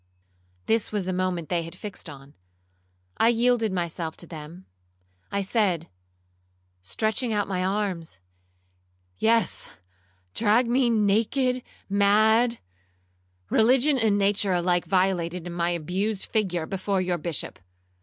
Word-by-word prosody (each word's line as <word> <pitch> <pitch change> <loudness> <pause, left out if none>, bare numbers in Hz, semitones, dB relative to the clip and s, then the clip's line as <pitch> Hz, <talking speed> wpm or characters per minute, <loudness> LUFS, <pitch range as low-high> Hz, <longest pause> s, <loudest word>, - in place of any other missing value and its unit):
This 225 -1 +1
was 205 -3 -2
the 185 - -2
moment 180 -3 -2
they 175 -2 +1
had 165 0 -8
fixed 200 -4 -8
on—I 90 - -7
yielded 235 -2 +2
myself 170 -2 -3
to - - -9
them. 165 +2 -10 0.7
I 200 0 0
said, 190 -5 0 0.9
stretching 220 - -1
out 205 -1 0
my 185 -2 -1
arms, 185 - -2 1.0
'Yes, 230 +1 +1 0.6
drag 230 +2 +3
me 245 +1 +2
naked, 230 +4 +2 0.3
mad—religion 200 - +1
and 215 -3 +3
nature 200 -1 +2
alike 175 0 +1
violated 180 -2 0
in 175 - -6
my 170 0 0
abused 185 +5 -1
figure—before 190 -1 -1
your 180 -1 -1
Bishop. 160 -1 -4
185 Hz, 110 wpm, -25 LUFS, 165-215 Hz, 1.0 s, drag